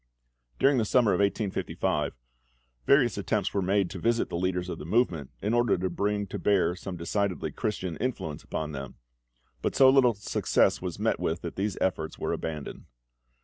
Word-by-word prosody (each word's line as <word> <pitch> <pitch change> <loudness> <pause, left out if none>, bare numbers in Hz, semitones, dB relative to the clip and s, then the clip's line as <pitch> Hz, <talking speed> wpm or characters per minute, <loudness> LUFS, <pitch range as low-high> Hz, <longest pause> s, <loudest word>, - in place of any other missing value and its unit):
During 135 -1 +4
the - - +2
summer 115 0 +3
of 90 - 0
1855 100 -7 0 0.7
various 125 -7 +4
attempts 100 0 -1
were 100 - +1
made 95 0 +1
to 95 - -6
visit 115 +4 +1
the - - -4
leaders 90 0 -1
of 90 - -5
the - - -7
movement, 85 - +1
in 105 +3 0
order 120 -4 +3
to 90 0 -2
bring 100 +3 -1
to 95 - -6
bear 95 -3 +2
some 90 0 -6
decidedly 95 +2 -1
Christian 95 -6 -3
influence 110 - -3
upon 75 -1 -4
them; 70 -2 -7 0.7
but - - -1
so 130 -1 +7
little 125 -4 +5
success 100 - +1
was - - -4
met - - 0
with, 80 +1 -1
that 85 - -6
these 100 0 -2
efforts 80 -4 -1
were - - -2
abandoned. 75 -3 -5
95 Hz, 180 wpm, -28 LUFS, 85-110 Hz, 0.7 s, so